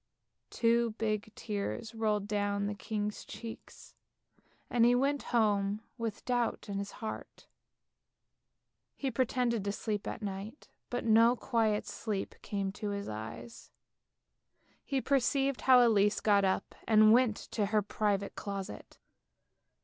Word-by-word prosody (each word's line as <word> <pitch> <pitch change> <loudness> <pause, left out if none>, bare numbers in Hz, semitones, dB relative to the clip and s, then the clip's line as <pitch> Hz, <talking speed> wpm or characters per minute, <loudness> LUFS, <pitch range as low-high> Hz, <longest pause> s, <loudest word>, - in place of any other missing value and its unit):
Two 235 -1 +2
big 215 -1 -1
tears 215 +2 -4
rolled 210 -2 0
down 205 -1 0
the 205 - -2
king's 210 0 -4
cheeks, 225 +2 -10 0.7
and 240 -1 +2
he 240 +1 +6
went 275 +3 +1
home 205 -3 +2
with 230 -3 -5
doubt 245 -2 -1
in 200 -1 -3
his 200 0 -5
heart. 215 - -7 1.5
He 270 -2 -2
pretended 245 -2 0
to 200 - -1
sleep 210 0 -3
at - - -5
night, 200 +6 -6 0.2
but 245 -1 -3
no 230 +2 +6
quiet 225 -4 0
sleep 210 -4 -4
came 200 -2 -2
to 205 +1 -5
his 200 0 -4
eyes. 110 - -8 1.1
He 270 -2 -1
perceived 275 0 +1
how 250 -2 +7
Elise 205 -2 +3
got 200 -2 +3
up 190 - -1
and 215 -1 +7
went 240 -3 +4 0.2
to 210 -3 0
her 210 0 +2
private 200 -1 -1
closet. 200 -1 -6
215 Hz, 130 wpm, -32 LUFS, 205-235 Hz, 1.5 s, how